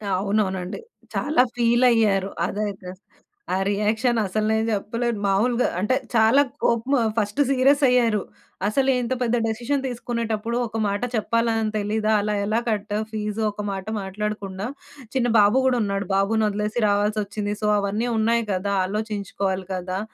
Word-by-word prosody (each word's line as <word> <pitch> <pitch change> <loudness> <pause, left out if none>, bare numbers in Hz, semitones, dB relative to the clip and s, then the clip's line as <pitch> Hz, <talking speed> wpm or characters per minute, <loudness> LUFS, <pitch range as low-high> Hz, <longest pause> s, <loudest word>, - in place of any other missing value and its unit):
అవునవునండి. 190 - -1 0.4
చాలా 295 -4 +2
ఫీలైయ్యారు. 230 -5 +3 0.2
అదైతే. 200 -2 -4 0.7
ఆ - - +1
రియాక్షన్ 220 +4 +1
అసలు 215 +3 -1
నేను 220 0 +1
జెప్పలేను. 230 +2 -1
మామూలుగా 235 +5 +2
అంటే 210 +7 +1 0.2
చాలా 225 +5 +5 0.2
కోపము, 235 +4 +2 0.2
ఫస్ట్ 210 +5 -1
సీరియస్ 275 +2 +3
అయ్యారు. 230 -5 +3 0.5
అసలు 265 +5 +1
ఇంత 240 +2 -1
పెద్ద 240 0 +1
డెసిషన్ 245 +5 -1
దీసుకునేటప్పుడు, 235 -2 -3
ఒక 225 - -6
మాట 200 +2 -2
చెప్పాలని 225 0 0
తెలీదా? 215 +1 0
అలా 210 0 -1
ఎలా 220 +3 +1
కట్టావు 210 0 -1
ఫీజ్? 210 0 -3
ఒక్క 210 0 -6
మాట 195 -1 -5 0.2
మాట్లాడకుండా, 200 0 -4 0.5
చిన్న 245 -2 +2
బాబు 205 +5 +5
గూడా 250 -2 +3
ఉన్నాడు. 200 -1 -2
బాబును 215 +3 +2
ఒదిలేసి 210 +2 -3
రావాల్సొచ్చింది. 205 0 -1
సో 210 - +2
అవన్నీ 205 +4 -1
ఉన్నాయి 230 +1 +2
గదా! 200 +2 -1
ఆలోచించుకోవాలి 200 -2 -3
గదా! 185 +1 -3
215 Hz, 135 wpm, -23 LUFS, 200-235 Hz, 0.7 s, చాలా